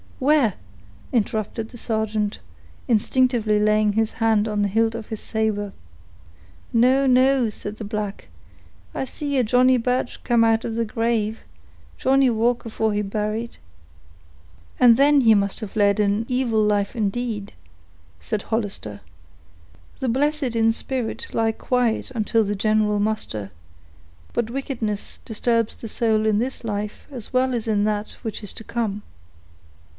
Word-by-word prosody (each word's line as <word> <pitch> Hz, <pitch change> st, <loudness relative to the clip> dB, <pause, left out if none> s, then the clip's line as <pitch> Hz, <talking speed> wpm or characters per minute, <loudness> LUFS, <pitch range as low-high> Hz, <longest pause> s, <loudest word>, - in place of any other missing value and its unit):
"Where?" 275 Hz, -6 st, +3 dB, 0.6 s
interrupted 220 Hz, 0 st, -1 dB
the 240 Hz, -, -11 dB
sergeant, 220 Hz, -2 st, -1 dB, 0.5 s
instinctively 230 Hz, -2 st, +2 dB
laying 215 Hz, 0 st, +3 dB
his 220 Hz, +1 st, 0 dB
hand 225 Hz, -2 st, +2 dB
on 210 Hz, -1 st, -1 dB
the 205 Hz, -, +2 dB
hilt 225 Hz, +3 st, +1 dB
of 230 Hz, -2 st, -6 dB
his 220 Hz, -, -5 dB
saber. 210 Hz, -2 st, -2 dB, 1.0 s
"No, 255 Hz, +4 st, +4 dB
no," 255 Hz, -1 st, +4 dB
said 210 Hz, 0 st, -7 dB
the -, -, -6 dB
black, 210 Hz, -1 st, -4 dB, 0.7 s
"I -, -, -1 dB
see 285 Hz, +1 st, -3 dB
a 255 Hz, -, +3 dB
Johnny 250 Hz, +3 st, +4 dB
Birch 250 Hz, +1 st, -1 dB
come 235 Hz, -2 st, +3 dB
out 225 Hz, 0 st, +3 dB
of 225 Hz, -, -3 dB
he 230 Hz, -, +1 dB
grave—Johnny 225 Hz, -, -1 dB
walk 235 Hz, +2 st, +1 dB
afore 220 Hz, -1 st, -1 dB
he 205 Hz, -, 0 dB
buried." 215 Hz, +3 st, -3 dB, 1.2 s
"Ah! 250 Hz, -, +6 dB
then 280 Hz, +4 st, +6 dB
he 225 Hz, -3 st, +6 dB
must 200 Hz, -1 st, 0 dB
have 215 Hz, -3 st, -7 dB
led 205 Hz, -1 st, +3 dB
an 205 Hz, +2 st, +1 dB
evil 245 Hz, -4 st, +1 dB
life 205 Hz, +1 st, +1 dB
indeed," 215 Hz, -1 st, -2 dB, 0.7 s
said 205 Hz, -, -3 dB
Hollister. 200 Hz, -, -3 dB, 1.0 s
"The 260 Hz, -, -1 dB
blessed 275 Hz, 0 st, 0 dB
in 225 Hz, 0 st, +4 dB
spirit 245 Hz, 0 st, -3 dB
lie 225 Hz, 0 st, +2 dB
quiet 245 Hz, +1 st, 0 dB
until 225 Hz, -1 st, +1 dB
the 205 Hz, 0 st, -2 dB
general 210 Hz, 0 st, +2 dB
muster, 205 Hz, -, -2 dB, 0.8 s
but 235 Hz, -2 st, -1 dB
wickedness 240 Hz, -6 st, -3 dB
disturbs 230 Hz, 0 st, 0 dB
the 225 Hz, -, -8 dB
soul 220 Hz, -1 st, +1 dB
in 215 Hz, -1 st, +3 dB
this 255 Hz, +3 st, -3 dB
life 210 Hz, -1 st, -4 dB
as 245 Hz, -6 st, -8 dB
well 255 Hz, 0 st, +2 dB
as 235 Hz, -2 st, -2 dB
in 210 Hz, -2 st, +2 dB
that 210 Hz, 0 st, -2 dB
which 220 Hz, -2 st, -5 dB
is 205 Hz, -, -4 dB
to -, -, -9 dB
come." 210 Hz, -3 st, -3 dB
225 Hz, 145 wpm, -23 LUFS, 210-245 Hz, 1.2 s, Ah